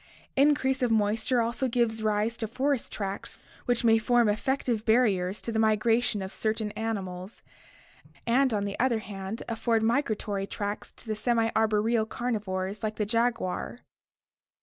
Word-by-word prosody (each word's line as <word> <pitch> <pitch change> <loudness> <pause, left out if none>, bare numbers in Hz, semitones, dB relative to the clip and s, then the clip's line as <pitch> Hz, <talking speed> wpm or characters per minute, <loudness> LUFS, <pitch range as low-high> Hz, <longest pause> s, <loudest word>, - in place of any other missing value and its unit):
Increase 270 -1 +3
of 250 - +2
mois 220 0 +1
ture 250 -2 +3
also 235 +3 -1
gives 230 -2 +1
rise 215 +1 +1
to 220 - -2
forest 265 +3 -1
tracts 195 -1 -4 0.3
which 245 -2 +1
may 225 -1 +5
form 240 0 +3
effective 235 +1 0
barriers 210 -5 +2
to 230 - -3
the 220 - 0
migration 220 0 +2
of 190 - -6
certain 215 -1 -1
animals, 195 -3 -5 0.8
and 255 +3 +3
on 205 -2 0
the 200 0 -5
other 245 -1 +3
hand 200 0 -6
afford 230 -1 0
migratory 215 -5 0
tracts 205 0 -4
to - - -12
the 220 - -2
semi 225 +1 +1
arboreal 220 +1 +2
carnivores 205 -5 -3
like 215 -1 -2
the 210 - -1
jaguar. 230 -2 -1
225 Hz, 150 wpm, -28 LUFS, 210-240 Hz, 0.8 s, may